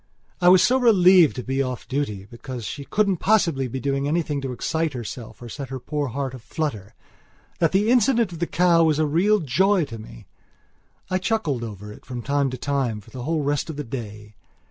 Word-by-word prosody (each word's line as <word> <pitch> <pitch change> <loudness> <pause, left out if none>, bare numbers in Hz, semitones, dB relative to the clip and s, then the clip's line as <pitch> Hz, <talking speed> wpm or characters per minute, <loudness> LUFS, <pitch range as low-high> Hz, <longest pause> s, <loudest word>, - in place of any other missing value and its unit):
I 175 - +6
was 185 0 +7
so 260 +2 +3
relieved 185 - +6
to 125 - -5
be 135 +2 -1
off 130 -3 -4
duty, 120 -7 -3
because 120 +2 -8
she 140 +4 -6
couldn't 200 0 +1
possibly 165 -10 +2
be 130 +2 -5
doing 140 +1 -1
anything 150 -2 -1
to 135 -1 -4
excite 160 +5 -2
herself 120 -1 -7
or - - -8
set 135 +2 -7
her 130 0 -5
poor 145 +3 -3
heart 130 +1 -3
a 130 - -8
flutteringthat 120 - -5
the 205 +4 +2
incident 235 -4 +3
of 170 - -8
the 170 - -1
cow 170 -1 +3
was 155 -2 +2
a 155 - +2
real 180 +8 +3
joy 180 +6 +2
to 115 -4 -9
me. 110 - -12 0.9
I 185 - +1
chuckled 175 - -1
over 105 -2 -8
it - - -16
from 125 -3 -7
time 140 +1 +1
to 130 - -5
time 130 -5 -1
for 105 - -17
the 130 - -7
whole 160 -1 0
rest 145 +2 -1
of 160 - -5
the 150 - -4
day. 105 -4 -8
140 Hz, 210 wpm, -23 LUFS, 125-170 Hz, 0.9 s, was